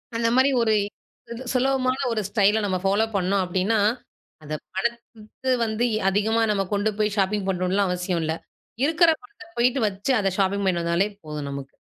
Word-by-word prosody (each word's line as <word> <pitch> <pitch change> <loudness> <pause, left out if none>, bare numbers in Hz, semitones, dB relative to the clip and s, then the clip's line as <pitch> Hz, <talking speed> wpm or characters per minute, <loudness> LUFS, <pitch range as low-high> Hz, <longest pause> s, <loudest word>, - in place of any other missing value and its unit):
அந்த 230 0 +1
மாரி 260 +2 +5
ஒரு 220 -1 +3 0.6
சு - - -5 0.2
சுலபமான 260 0 +1
ஒரு 220 -2 0
ஸ்டைல 210 0 +3
நம்ம 185 -2 0
ஃபாலோ 200 +3 +2
பண்ணோம் 190 +1 +1
அப்டின்னா, 190 +5 0 0.7
அந்த 155 +1 -4 0.2
பணத்த 235 +3 -3
வந்து 220 +2 0
எ - - -1
அதிகமா 220 +3 +1
நம்ம 195 -1 +1
கொண்டு 205 +2 +1
போய் 210 -1 +1
ஷாப்பிங் 195 0 0
பண்ணணும்லா 185 +2 +1
அவசியம் 180 -1 -1
இல்ல, 160 0 -1 0.5
இருக்கிற 330 +2 +4
பணத்த 410 -3 -15
போயிட்டு 250 +2 +2
வச்சு 200 +7 -2
அத 195 -2 +1
ஷாப்பிங் 200 +1 +1
பண்ணிட்டு 175 -3 +1
வந்தாலே 170 +5 +1
போதும் 150 -2 -5
நமக்கு. 140 -1 -8
205 Hz, 165 wpm, -24 LUFS, 185-235 Hz, 0.7 s, மாரி